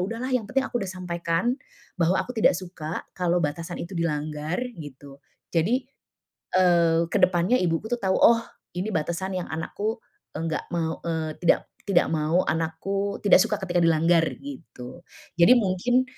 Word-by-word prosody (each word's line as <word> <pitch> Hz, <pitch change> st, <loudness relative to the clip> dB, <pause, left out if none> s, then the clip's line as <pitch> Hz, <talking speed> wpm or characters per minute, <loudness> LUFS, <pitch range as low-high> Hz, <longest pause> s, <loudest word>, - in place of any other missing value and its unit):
udahlah, 230 Hz, +7 st, -3 dB
yang 225 Hz, -5 st, 0 dB
penting 270 Hz, +4 st, +1 dB
aku 240 Hz, -, -2 dB
udah 195 Hz, -, -3 dB
sampaikan, 175 Hz, +3 st, -1 dB, 0.5 s
bahwa 170 Hz, +3 st, +3 dB
aku 250 Hz, -, -2 dB
tidak 220 Hz, -6 st, +3 dB
suka 175 Hz, -3 st, -6 dB
kalau 180 Hz, -1 st, +1 dB
batasan 165 Hz, +4 st, -4 dB
itu 170 Hz, -, -7 dB
dilanggar, 155 Hz, -1 st, -2 dB, 0.2 s
gitu. 140 Hz, -1 st, -11 dB, 0.3 s
Jadi, 215 Hz, +11 st, +1 dB, 0.7 s
eee, 170 Hz, -3 st, +4 dB
ke -, -, -1 dB
depannya 185 Hz, +4 st, +3 dB
ibuku 175 Hz, +3 st, 0 dB
tuh 245 Hz, -, 0 dB
tahu, 190 Hz, -5 st, 0 dB
"Oh, 230 Hz, 0 st, +5 dB, 0.3 s
ini 200 Hz, +4 st, -2 dB
batasan 180 Hz, +4 st, -2 dB
yang -, -, -6 dB
anakku 205 Hz, +7 st, -3 dB, 0.4 s
enggak 160 Hz, -1 st, -3 dB
mau, 165 Hz, -2 st, -2 dB
eee, 160 Hz, -2 st, -2 dB
tidak 175 Hz, -, +3 dB, 0.3 s
tidak 175 Hz, -3 st, +4 dB
mau 160 Hz, +3 st, +1 dB
anakku, 180 Hz, +5 st, -2 dB
tidak 200 Hz, -, +7 dB
suka 215 Hz, +1 st, +1 dB
ketika 175 Hz, -1 st, +1 dB
dilanggar," 165 Hz, 0 st, +4 dB
gitu. 175 Hz, -, -10 dB, 0.4 s
Jadi 240 Hz, +9 st, +8 dB
mungkin 240 Hz, +4 st, +2 dB
175 Hz, 150 wpm, -25 LUFS, 165-200 Hz, 0.7 s, Jadi